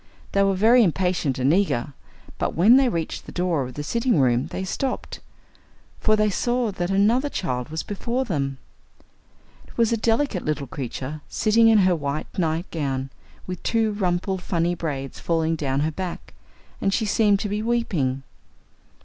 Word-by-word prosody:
They 200 Hz, -, +2 dB
were 195 Hz, -1 st, +3 dB
very 230 Hz, +5 st, +5 dB
impatient 180 Hz, -6 st, 0 dB
and 130 Hz, +4 st, +3 dB
eager, 145 Hz, -9 st, 0 dB, 0.5 s
but -, -, -1 dB
when 215 Hz, +10 st, +6 dB
they 270 Hz, -2 st, +4 dB
reached 165 Hz, -6 st, -4 dB
the -, -, -7 dB
door 175 Hz, -4 st, 0 dB
of 125 Hz, -1 st, -6 dB
the 145 Hz, -, -4 dB
sitting 235 Hz, -, +1 dB
room 125 Hz, -1 st, +2 dB
they 190 Hz, -, -5 dB
stopped, 255 Hz, +7 st, -3 dB, 0.8 s
for 215 Hz, -, +3 dB
they 215 Hz, -1 st, +2 dB
saw 240 Hz, +2 st, 0 dB
that 175 Hz, -2 st, -3 dB
another 220 Hz, +8 st, +3 dB
child 125 Hz, -, -3 dB
was 160 Hz, +1 st, -3 dB
before 235 Hz, +5 st, -2 dB
them. 140 Hz, -, -2 dB, 1.1 s
It -, -, -18 dB
was 230 Hz, -1 st, +3 dB
a -, -, +1 dB
delicate 225 Hz, -2 st, 0 dB
little 150 Hz, -2 st, -2 dB
creature, 135 Hz, +3 st, -6 dB
sitting 225 Hz, +1 st, +3 dB
in 225 Hz, -1 st, +6 dB
her 185 Hz, -1 st, +3 dB
white 145 Hz, -1 st, -4 dB
night 165 Hz, 0 st, 0 dB
gown, 135 Hz, -4 st, -2 dB, 0.3 s
with 180 Hz, -1 st, -6 dB
two 225 Hz, -2 st, +1 dB
rumpled 190 Hz, -1 st, -1 dB
funny 175 Hz, -1 st, 0 dB
braids 140 Hz, -6 st, -4 dB
falling 165 Hz, -1 st, 0 dB
down 140 Hz, -3 st, -1 dB
her 155 Hz, +2 st, 0 dB
back, 180 Hz, +2 st, -6 dB, 0.5 s
and 195 Hz, -, +1 dB
she 220 Hz, +3 st, 0 dB
seemed 205 Hz, -1 st, +3 dB
to 210 Hz, -, -2 dB
be 210 Hz, +1 st, -2 dB
weeping. 180 Hz, -, 0 dB
180 Hz, 170 wpm, -24 LUFS, 150-215 Hz, 1.1 s, when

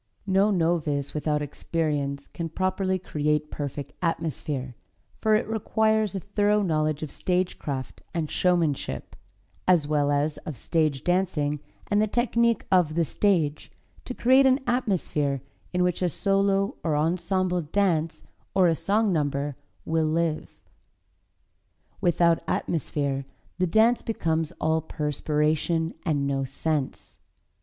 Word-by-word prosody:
No 195 Hz, +1 st, +3 dB
novice 160 Hz, -6 st, 0 dB
without 150 Hz, -1 st, 0 dB
experience 145 Hz, -2 st, -2 dB
can 165 Hz, -1 st, -4 dB
properly 185 Hz, +2 st, 0 dB
create 150 Hz, -3 st, -1 dB
perfect 145 Hz, -1 st, -5 dB
atmosphere, 150 Hz, -6 st, -2 dB, 0.5 s
for 220 Hz, -1 st, +3 dB
it 215 Hz, -, +1 dB
requires 220 Hz, -1 st, +1 dB
a -, -, -1 dB
thorough 205 Hz, +2 st, +1 dB
knowledge 155 Hz, -3 st, 0 dB
of 150 Hz, -, -5 dB
stage 180 Hz, 0 st, -1 dB
craft 135 Hz, -3 st, -5 dB
and 165 Hz, -3 st, -2 dB
showmanship, 170 Hz, -6 st, 0 dB, 0.5 s
as 175 Hz, -5 st, +4 dB
well 145 Hz, -1 st, +2 dB
as 145 Hz, +1 st, +1 dB
of 155 Hz, -5 st, -7 dB
stage 155 Hz, 0 st, 0 dB
dancing 165 Hz, -5 st, +1 dB, 0.3 s
and 205 Hz, 0 st, +2 dB
the 215 Hz, -, +2 dB
technique 235 Hz, 0 st, +1 dB
of 175 Hz, -5 st, +3 dB
the 170 Hz, -1 st, +2 dB
stage, 160 Hz, -6 st, 0 dB, 0.3 s
to 250 Hz, -, -5 dB
create 260 Hz, +2 st, +5 dB
an 265 Hz, +2 st, +3 dB
atmosphere 165 Hz, -, 0 dB, 0.3 s
in 180 Hz, 0 st, +1 dB
which 180 Hz, 0 st, 0 dB
a 180 Hz, -, +2 dB
solo 195 Hz, -, +1 dB
or 155 Hz, -2 st, +1 dB
ensemble 180 Hz, +3 st, 0 dB
dance, 165 Hz, -1 st, 0 dB, 0.3 s
or 185 Hz, -2 st, +5 dB
a 165 Hz, -, +4 dB
song 205 Hz, +4 st, +1 dB
number 145 Hz, -2 st, -1 dB, 0.3 s
will 160 Hz, -1 st, +1 dB
live. 160 Hz, 0 st, 0 dB, 1.5 s
Without 170 Hz, -1 st, +3 dB
atmosphere 140 Hz, -4 st, -1 dB, 0.4 s
the 185 Hz, -, +2 dB
dance 220 Hz, +7 st, +4 dB
becomes 165 Hz, -7 st, -1 dB
all 160 Hz, +1 st, +1 dB
perspiration 155 Hz, +2 st, 0 dB
and 145 Hz, -4 st, 0 dB
no 135 Hz, -1 st, 0 dB
sense. 145 Hz, +1 st, -3 dB
165 Hz, 130 wpm, -26 LUFS, 150-195 Hz, 1.5 s, create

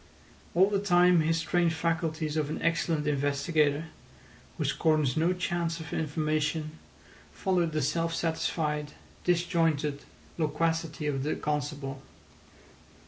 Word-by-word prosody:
All 185 Hz, +3 st, +6 dB
the 200 Hz, -1 st, 0 dB
time 180 Hz, -3 st, +5 dB
his 165 Hz, +1 st, +1 dB
trained 170 Hz, 0 st, +2 dB
faculties 160 Hz, -1 st, -1 dB
of 150 Hz, -2 st, 0 dB
an 155 Hz, -, -3 dB
excellent 165 Hz, -2 st, +1 dB
investigator, 145 Hz, +1 st, +1 dB, 0.7 s
who -, -, -1 dB
scorns 155 Hz, -5 st, +2 dB
no 165 Hz, +3 st, +2 dB
chance 175 Hz, -2 st, -1 dB
of 160 Hz, -, -7 dB
information, 155 Hz, 0 st, -1 dB, 0.5 s
followed 180 Hz, -4 st, 0 dB
the 155 Hz, -2 st, 0 dB
self 165 Hz, +4 st, 0 dB
satisfied, 150 Hz, -3 st, -1 dB, 0.3 s
disjointed 165 Hz, -5 st, +1 dB, 0.4 s
loquacity 160 Hz, 0 st, -1 dB
of 140 Hz, -2 st, -1 dB
the 150 Hz, +3 st, -1 dB
constable. 145 Hz, -2 st, -3 dB
160 Hz, 115 wpm, -29 LUFS, 150-165 Hz, 0.7 s, All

